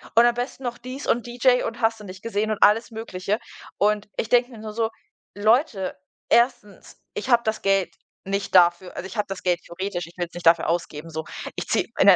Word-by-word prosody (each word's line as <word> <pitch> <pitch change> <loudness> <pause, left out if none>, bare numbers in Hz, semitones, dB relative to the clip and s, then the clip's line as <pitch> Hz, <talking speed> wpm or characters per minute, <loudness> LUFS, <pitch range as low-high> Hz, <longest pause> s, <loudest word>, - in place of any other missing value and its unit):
Und 235 +1 +7
am 240 - +4
besten 245 +3 -4
noch 240 -1 -4
dies 255 +3 -7
und 240 0 +1
DJ 250 +1 +3
und 230 +2 -5
hast 225 0 +2
du 210 - -10
nicht 185 0 -10
gesehen 215 -1 -1
und 215 - 0
alles 220 +4 +5
Mögliche. 210 -3 -3 0.4
Und 210 0 +1
ich - - -1
denke 245 0 +4
mir 240 - -12
nur 215 0 -7
so: 225 0 0 0.5
„Leute. 215 -1 +2 0.3
1.: 235 -4 +1
Ich 430 - -5
habe 240 -1 +5
das 220 0 -1
Geld 195 -3 +1 0.3
nicht 195 0 -2
dafür. 175 0 +4
Also, - - -5
ich 190 +2 -8
habe 210 - 0
das 195 -1 -6
Geld 180 -2 +2
theoretisch, 175 -1 -4
ich 170 - -17
will's 175 -1 -4
nicht 175 -1 -2
dafür 165 0 +5
ausgeben, 165 -1 -2
so. 160 0 -4 0.3
Ich - - -4
ziehe - - +1
in - - +5
'nen - - +10
210 Hz, 220 wpm, -24 LUFS, 185-235 Hz, 0.5 s, nen